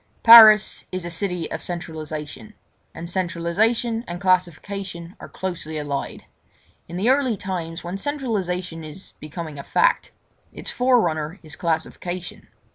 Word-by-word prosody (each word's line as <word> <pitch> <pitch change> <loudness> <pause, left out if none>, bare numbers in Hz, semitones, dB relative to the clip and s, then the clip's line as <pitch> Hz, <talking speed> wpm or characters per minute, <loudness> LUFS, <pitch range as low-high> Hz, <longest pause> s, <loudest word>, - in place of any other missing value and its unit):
Paris 220 -2 +9
is 185 -1 -4
a 175 - -5
city 175 -1 -2
of - - -4
centralisation—and 160 +2 -7
centralisation 195 +7 0
and 175 0 -5
classification 185 0 -1
are - - -10
closely 170 -4 -5
allied. 145 -2 -4 0.6
In 175 - -6
the 215 +7 +3
early 265 -5 +1
times, 175 -3 -5
when 175 +3 -4
centralisation 190 - -3
is 155 +5 -9
becoming 155 -1 -7
a - - -6
fact, - - +2 0.4
its - - -3
forerunner 185 -10 +1
is 155 -2 -7
classification. 170 +2 -4
180 Hz, 120 wpm, -23 LUFS, 165-205 Hz, 0.6 s, Paris